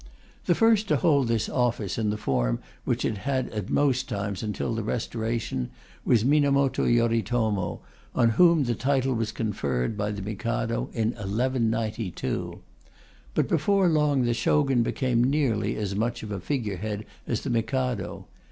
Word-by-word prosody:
The - - +4
first 225 -2 +4
to - - +3
hold 145 -7 +3
this 115 -2 0
office 115 -5 -1
in 110 -2 +1
the 105 - -1
form - - 0 0.3
which - - 0
it 105 - -1
had 130 +1 -1
at 105 -3 -5
most 130 -2 +1
times 100 -3 -3
until 110 +2 -2
the 115 - -2
Restoration 110 - -2 0.3
was 115 -2 +3
Minamoto 140 -1 +3
Yoritomo, 115 -4 +1 0.3
on 115 - +4
whom 170 +5 +5
the 120 -2 0
title 135 +2 +1
was 115 -2 -1
conferred 85 - -2
by 105 0 -1
the 100 -2 -5
Mikado 115 +3 -2
in 110 -2 +1
1192. 115 -2 -2 0.7
But - - +2
before 190 +4 +2
long 150 -4 +2
the 120 -1 +2
Shogun 135 0 +2
became 120 0 +1
nearly 130 -5 +1
as 100 -2 -3
much 115 +3 -1
of 105 - -6
a 100 - -3
figure 110 -2 -2
head 105 +2 -4 0.2
as 115 - -1
the 135 - -3
Mikado. 120 -2 -1
115 Hz, 155 wpm, -26 LUFS, 105-130 Hz, 0.7 s, whom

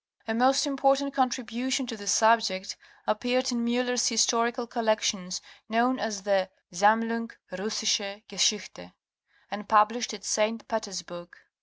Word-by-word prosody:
A 225 - -1
most 265 +4 +3
important 275 0 +1
contribution 255 0 -1
to 240 -2 -6
the 205 -2 -10
subject 220 -3 +3 0.3
appeared 250 +4 0
in 235 -1 -1
Miiller's 245 0 +1
Historical 235 +1 +2
Collections 215 -5 -1 0.3
known 240 +4 +2
as 210 -2 -3
the 195 -2 +1 0.2
''Sammlung 225 +4 +2 0.2
Russische 205 +1 -1
Geschichte"' 185 - -1 0.6
and 200 +1 -7
published 220 +2 +3
at 205 - -13
St. 215 +1 0
Petersburg 180 -6 -5
(Kayserl. - - -21
225 Hz, 125 wpm, -27 LUFS, 205-245 Hz, 0.6 s, most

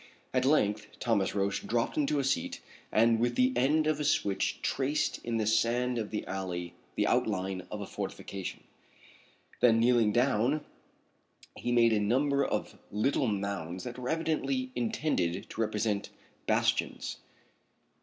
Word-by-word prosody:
At 130 0 +2
length 105 -7 +1
Thomas 105 -5 +1
Roch 100 0 0
dropped 115 0 0
into 150 0 +1
a 140 - +1
seat 135 +1 -1 0.3
and 115 +1 +4
with 120 +1 +1
the 125 +1 +3
end 145 +5 +3
of 155 -1 +1
a - - -1
switch 100 -9 +1
traced 140 +3 0
in 115 -1 -1
the 110 - 0
sand 120 +3 +2
of 110 - -3
the 105 - -3
alley 90 -2 -4 0.2
the - - +2
outline 95 -3 0
of 105 - -5
a - - -4
fortification. 95 0 -6 1.0
Then 115 -2 +5
kneeling 115 -2 +4
down 125 +4 +2 0.9
he 120 - -3
made 115 -1 +5
a 105 - +3
number 140 +7 +2
of - - -3
little 130 +6 +1
mounds 100 -4 -3
that 125 0 -6
were 125 0 -4
evidently 165 - -1
intended 150 - -1
to 115 - -3
represent 105 -1 -1 0.4
bastions. - - 0
115 Hz, 145 wpm, -30 LUFS, 105-135 Hz, 1.0 s, Then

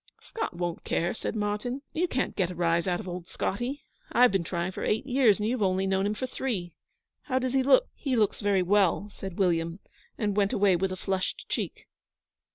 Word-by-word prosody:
'Scott 445 - -5
won't 175 -1 -3
care,' 170 +1 0
said 225 - -4
Martyn. 210 +6 -2
'You 350 +3 +1
can't 255 -6 -1
get 185 -3 +1
a 180 - -6
rise 170 0 +1
out 175 -1 +1
of - - -7
old 180 -1 -6
Scotty. 245 +8 -3 0.3
I've 250 -1 +6
been 195 -3 +1
trying 175 +2 -2
for - - -6
eight 220 +5 0
years, 250 -6 +4
and 210 - 0
you've 240 0 -1
only 190 -1 +2
known 190 +1 +1
him 210 - -1
for 260 - -3
three. 210 -10 -3 0.5
How 260 -3 0
does 255 0 0
he 270 - +4
look?' 280 - +5
'He 270 -4 -2
looks 215 -2 +1
very 200 -2 +2
well,' 200 +1 +2
said 190 -3 -7
William, 170 -3 +1 0.4
and 205 -3 0
went 205 -1 +2
away 200 -2 +4
with 190 +2 0
a - - -2
flushed 190 0 -2
cheek. - - -3
200 Hz, 210 wpm, -28 LUFS, 180-245 Hz, 0.5 s, I've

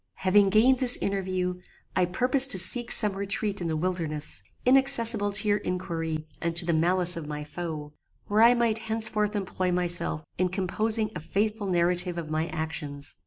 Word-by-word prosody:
"Having 195 +1 +2
gained 240 +6 +3
this 250 -2 +5
interview, 185 -2 -3 0.3
I 185 - +2
purposed 255 +9 +3
to 220 - 0
seek 235 +6 +3
some 210 -2 +5
retreat 200 0 -4
in 170 - -3
the 160 -1 -2
wilderness, 160 -3 -2 0.2
inaccessible 240 -5 +3
to 200 +1 +3
your 205 0 +1
inquiry 165 -4 -4 0.2
and 170 0 -3
to 175 0 +3
the 170 - 0
malice 180 +2 +1
of 160 -3 -7
my 150 0 -6
foe, 150 -2 -7 0.3
where 210 +1 +1
I 235 +2 +6
might 230 -2 0
henceforth 220 -1 -1
employ 185 -2 -3
myself 175 -3 0
in 185 0 +1
composing 215 +4 0
a - - -4
faithful 210 +5 -3
narrative 180 0 0
of 160 -2 -6
my 155 +1 -2
actions. 155 -3 -5
185 Hz, 170 wpm, -26 LUFS, 170-215 Hz, 0.3 s, I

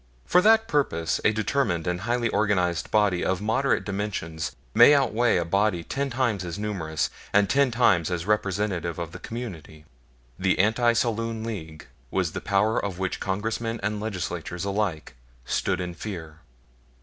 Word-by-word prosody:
For 180 - +4
that 220 +2 +5
purpose 85 - 0
a - - +4
determined 110 - 0
and 90 0 -2
highly 120 +2 0
organized 90 -8 +1
body 105 -4 +2
of 95 -1 0
moderate 115 +7 +1
dimensions 95 -6 -3 0.2
may 145 - +8
outweigh 120 -5 +2
a 85 - 0
body 100 0 +1
ten 140 +9 -2
times 120 -7 0
as 85 +1 -5
numerous 95 -8 -2 0.2
and 105 0 +4
ten 140 +3 +3
times 115 -9 +3
as 90 -2 -2
representative 100 -5 -1
of 85 -2 -5
the - - -9
community. 85 -10 -8 0.5
The 95 0 +2
Anti 115 +4 +3
Saloon 115 -1 -1
League 80 -9 -6 0.2
was 90 -1 0
the - - -5
power 105 +2 +1
of 100 -3 -3
which 95 -1 -2
Congressmen 115 +4 -2
and 105 +1 -1
Legislaturemen 90 -4 -4
alike 100 -8 -2 0.3
stood 95 +6 0
in 90 -1 -4
fear. 85 -4 -7
100 Hz, 155 wpm, -25 LUFS, 85-115 Hz, 0.5 s, may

